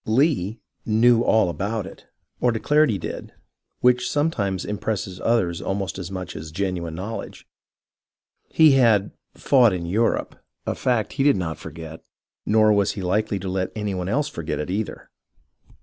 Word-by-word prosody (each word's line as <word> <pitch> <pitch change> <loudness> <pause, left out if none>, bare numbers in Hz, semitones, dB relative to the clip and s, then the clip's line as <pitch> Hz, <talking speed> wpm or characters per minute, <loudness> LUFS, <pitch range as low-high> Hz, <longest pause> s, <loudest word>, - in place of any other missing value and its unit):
Lee 115 - +1
" - - -51
knew 115 +2 +4
all 110 -4 +3
about 100 +5 -2
it," - - -12 0.3
or 125 - +3
declared 150 +7 +3
he 105 - 0
did, - - -7 0.5
which 125 0 +3
some 150 +3 +1
times 100 - -2
impresses 100 -3 -3
others 95 -8 +1
almost 95 -2 -3
as 90 -1 -6
much 95 -2 -6
as 80 0 -7
genuine 85 -2 -3
know 100 +6 -4
ledge. - - -10 1.0
He 160 -2 +6
had 115 -7 +4
" - - -54
fought 125 -7 +4
in 85 -2 -3
Europe," 110 +7 0 0.3
a - - -1
fact 120 -4 -1
he 135 - 0
did 145 0 +5
not 80 -4 -3
forget, 80 0 -9 0.5
nor 110 0 +5
was 100 -1 +2
he 100 - -6
likely 105 +3 0
to 95 - -5
let 95 0 -2
any 105 -2 -2
one 90 0 -3
else 145 +7 +1
forget 85 - -4
it 75 +4 -4
either. 105 +3 -4
105 Hz, 175 wpm, -23 LUFS, 90-115 Hz, 1.0 s, He